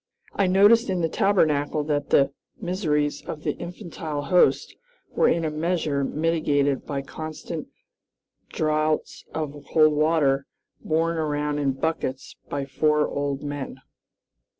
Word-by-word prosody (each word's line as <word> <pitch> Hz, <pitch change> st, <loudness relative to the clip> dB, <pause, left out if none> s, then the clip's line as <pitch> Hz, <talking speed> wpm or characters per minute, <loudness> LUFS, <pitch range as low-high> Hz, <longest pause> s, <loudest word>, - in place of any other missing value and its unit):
I 195 Hz, -, +2 dB
noticed 205 Hz, +5 st, +5 dB
in 185 Hz, -2 st, 0 dB
the 165 Hz, -, +1 dB
Tabernacle 155 Hz, -8 st, +2 dB
that 145 Hz, -1 st, -1 dB
the 140 Hz, 0 st, +4 dB, 0.3 s
miseries 155 Hz, -5 st, -1 dB
of 150 Hz, -1 st, -7 dB
the -, -, +1 dB
infantile 165 Hz, -5 st, -6 dB
host 180 Hz, +5 st, +3 dB, 0.4 s
were -, -, +3 dB
in 165 Hz, -1 st, +1 dB
a 155 Hz, -, -1 dB
measure 155 Hz, -3 st, 0 dB
mitigated 145 Hz, -2 st, 0 dB
by 140 Hz, -1 st, -3 dB
constant 155 Hz, +2 st, -6 dB, 0.8 s
draughts 155 Hz, 0 st, -1 dB
of 150 Hz, -2 st, -3 dB, 0.2 s
cold 155 Hz, -1 st, +5 dB
water, 150 Hz, -3 st, +2 dB, 0.4 s
borne 165 Hz, +1 st, +1 dB
around 150 Hz, -1 st, -1 dB
in 140 Hz, -2 st, +1 dB
buckets 135 Hz, -2 st, -3 dB
by 140 Hz, -1 st, -2 dB
four 150 Hz, +2 st, +2 dB
old 140 Hz, -1 st, -3 dB
men. 145 Hz, -2 st, -5 dB
155 Hz, 125 wpm, -25 LUFS, 145-165 Hz, 0.8 s, noticed